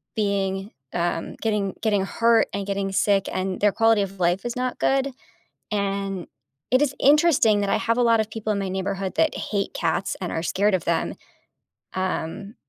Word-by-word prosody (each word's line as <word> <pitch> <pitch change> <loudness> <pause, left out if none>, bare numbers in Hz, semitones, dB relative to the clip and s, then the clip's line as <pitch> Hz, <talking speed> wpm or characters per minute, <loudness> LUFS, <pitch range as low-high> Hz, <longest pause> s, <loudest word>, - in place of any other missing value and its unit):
being, 200 -1 -1 0.2
um, 170 -1 -2
getting 210 -3 0
getting 205 -3 +2
hurt 230 +2 +3
and 200 0 -3
getting 195 -1 -1
sick, 195 0 +2
and 185 0 -2
their 205 0 +5
quality 225 -1 +3
of 195 -1 -4
life 175 +2 +1
is 240 - -3
not 255 0 -2
good. 270 0 +1 0.6
And 195 -2 -2 0.4
it 255 - +4
is 290 -2 +2
interesting 285 -8 +4
that 200 - -1
I - - +3
have 230 +1 0
a - - +3
lot 230 -1 +4
of 220 -1 0
people 220 -1 -3
in 200 - -1
my 195 - -2
neighborhood 190 0 -3
that 320 - +2
hate 200 -2 -2
cats - - -1
and 180 - -3
are 160 - -2
scared 200 +4 +1
of 180 - -2
them. 170 -1 0 0.8
Um, 190 +2 -3
200 Hz, 185 wpm, -24 LUFS, 190-225 Hz, 0.8 s, their